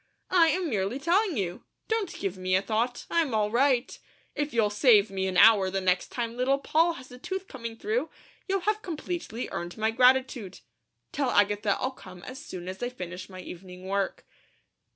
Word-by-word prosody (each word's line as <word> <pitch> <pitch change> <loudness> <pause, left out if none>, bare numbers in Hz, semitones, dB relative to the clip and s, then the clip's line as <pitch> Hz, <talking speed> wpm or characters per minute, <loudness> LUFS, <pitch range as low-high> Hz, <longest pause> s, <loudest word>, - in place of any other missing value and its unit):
"I 350 -3 +6
am 360 +2 +1
merely 210 -2 -1
telling 345 +4 +1
you! 180 -3 -3 0.2
Don't 445 -5 -1
give 195 -2 -2
me 185 0 0
a 190 - +2
thought! 235 +3 -1
I'm 320 -9 +1
all 210 -1 +1
right! 255 +1 +2 0.3
If 295 0 -2
you'll 220 -3 +2
save 210 -2 +5
me 190 -1 -1
an 185 -1 -1
hour 205 -3 +7
the 195 +1 -1
next 185 -1 +1
time 235 -1 -3
Little 260 +3 +2
Poll 325 +4 +2
has 260 -4 -12
a 250 - -11
tooth 380 +6 -5
coming 230 -4 -7
through, 435 - -1 0.4
you'll 390 -1 0
have 425 +3 0
completely 335 - -4
earned 175 +3 -5
my 220 +1 +1
gratitude. 255 -3 +2 0.5
Tell 275 -3 0
Agatha 205 -1 +2
I'll 260 - -1
come 180 -8 -13
as 255 +1 -8
soon 180 -1 -8
as 190 +1 -6
I 245 - -1
finish 180 -6 -7
my 185 -1 -9
evening 180 +1 -10
work." 195 0 -2
235 Hz, 190 wpm, -28 LUFS, 195-285 Hz, 0.5 s, hour